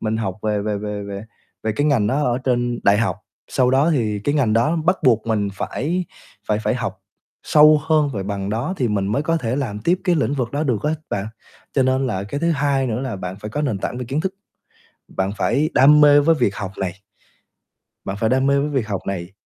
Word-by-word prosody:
mình 110 0 -1
học 95 -4 -3
về 105 -1 0
về 105 -1 -2
về 105 0 -4
về 100 +1 -6 0.4
về 110 - -1
cái 145 +7 0
ngành 125 -9 +2
đó 135 +7 +1
ở 125 -2 +1
trên 120 -2 -1
đại 100 +1 +4
học, 115 - 0 0.3
sau 125 -1 +2
đó 140 +5 +3
thì 110 -8 0
cái 145 - +1
ngành 125 -7 +2
đó 120 +9 +2
bắt 185 +2 +2
buộc 115 -4 +3
mình 105 -3 0
phải 165 - -2 0.4
phải 105 0 +2
phải 105 - +1
học - - -4 0.4
sâu 150 0 +6
hơn 155 -2 +3
về 100 - -2
bằng 100 0 -4
đó 120 - -2
thì 125 -3 0
mình 100 -2 0
mới 105 +8 0
có 165 +2 +1
thể 125 -4 -2
làm 110 -8 -3
tiếp 175 - +1
cái 180 - +3
lĩnh 145 -3 0
vực 125 -4 -2
đó 145 +2 -1
được 120 -8 -1
á 150 - +1 0.2
bạn. 100 +1 -2 0.5
Cho 135 - +2
nên 130 +1 +1
là 100 -5 -2
cái 140 +8 -5
thứ 170 - +1
hai 140 -3 +1
nữa 115 -1 -2
là 130 -6 -4
bạn 90 0 -6
phải 105 - -6
có 145 - -3
nền 125 -9 -1
tảng 125 - -4
về 125 - -4
kiến 135 +6 -2
thức, 190 +2 -3 0.7
bạn 95 +1 -2
phải 155 +4 +1
đam 150 +3 +6
mê 145 -1 +7
với 165 +3 +4
việc 100 - +1
học 95 -2 -5
này. 95 -2 -2 1.1
Bạn 95 0 -4
phải 110 - +1
đam 130 +1 +2
mê 140 0 +3
với 145 +1 -1
việc 130 -7 -1
học 100 -3 -3
này 95 -1 -4
125 Hz, 240 wpm, -21 LUFS, 105-145 Hz, 1.1 s, mê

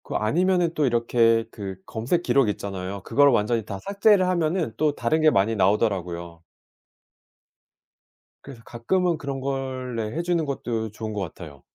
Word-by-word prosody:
그 - - -6
아니면은 175 +8 +1
또 150 - +1
이렇게 115 -2 +2
그 100 -3 -6
검색 125 - -1
기록 135 -9 +3
있잖아요. 100 -1 -5
그걸 145 +5 +4
완전히 115 -1 +1
다 100 -2 -5
삭제를 200 - +3
하면은 170 -6 0
또 155 -2 +2
다른 155 +7 0
게 155 - +6
많이 110 -3 +2
나오더라고요. 90 -5 0 2.0
그래서 135 -4 -11
가끔은 170 +9 0
그런 140 -2 -5
걸 130 -2 -4
네 110 -2 -3
해 - - 0
주는 170 -2 0
것도 120 -5 -3
좋은 110 0 -6
것 105 - -3
같아요. 80 -5 -8
120 Hz, 320 characters per minute, -24 LUFS, 105-155 Hz, 2.0 s, 게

